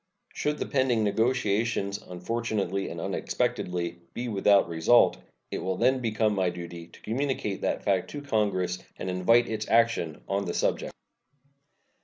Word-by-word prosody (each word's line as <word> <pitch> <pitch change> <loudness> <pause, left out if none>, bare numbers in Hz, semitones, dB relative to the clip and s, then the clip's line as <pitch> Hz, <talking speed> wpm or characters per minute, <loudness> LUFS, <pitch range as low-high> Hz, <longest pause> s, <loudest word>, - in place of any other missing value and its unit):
Should 150 0 -1
the - - -2
pending 130 -5 +1
negotiations, 105 -2 +1
unfortunately 100 0 -2
and - - -6
unexpectedly, 85 -1 -2 0.2
be 125 - -3
without 100 -2 +4
result, 85 +8 +4 0.3
it - - -2
will 95 0 -2
then 130 +2 +3
become 110 -2 +1
my 95 -3 +1
duty 85 -1 -8
to - - -17
communicate 120 -4 -2
that - - -1
fact 95 -3 +1
to 145 - -6
Congress 95 -8 0 0.2
and 95 - -3
invite 115 +7 +4
its 110 -1 -3
action 115 -9 +2
on 100 0 -1
the 85 - -3
subject. - - 0
105 Hz, 145 wpm, -27 LUFS, 90-115 Hz, 0.3 s, without